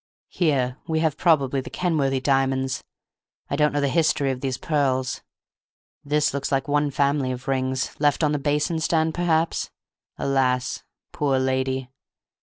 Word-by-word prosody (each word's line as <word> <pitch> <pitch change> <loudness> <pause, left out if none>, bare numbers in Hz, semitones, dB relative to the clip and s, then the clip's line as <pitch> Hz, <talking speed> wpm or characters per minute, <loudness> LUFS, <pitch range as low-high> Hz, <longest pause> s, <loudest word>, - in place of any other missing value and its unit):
Here 135 -6 0
we 160 - 0
have 160 -3 +1
probably 140 -6 +2
the - - -9
Kenworthy 145 -7 0
diamonds.... 135 -1 0 0.7
I - - +1
don't 150 +1 +3
know 145 - 0
the 140 - +1
history 145 -2 +2
of 130 -1 -5
these 130 -2 -2
pearls.... 130 -4 0 0.8
This 150 0 +1
looks 140 -1 -3
like 135 0 0
one 145 0 +2
family 140 -1 +1
of 130 +2 -7
rings—left 135 +3 0
on 150 - +3
the 150 - 0
basin 150 +3 0
stand, 160 0 +1
perhaps—alas, 140 -6 -1 0.3
poor 140 -2 +1
lady! 130 0 -1
140 Hz, 140 wpm, -24 LUFS, 130-150 Hz, 0.8 s, don't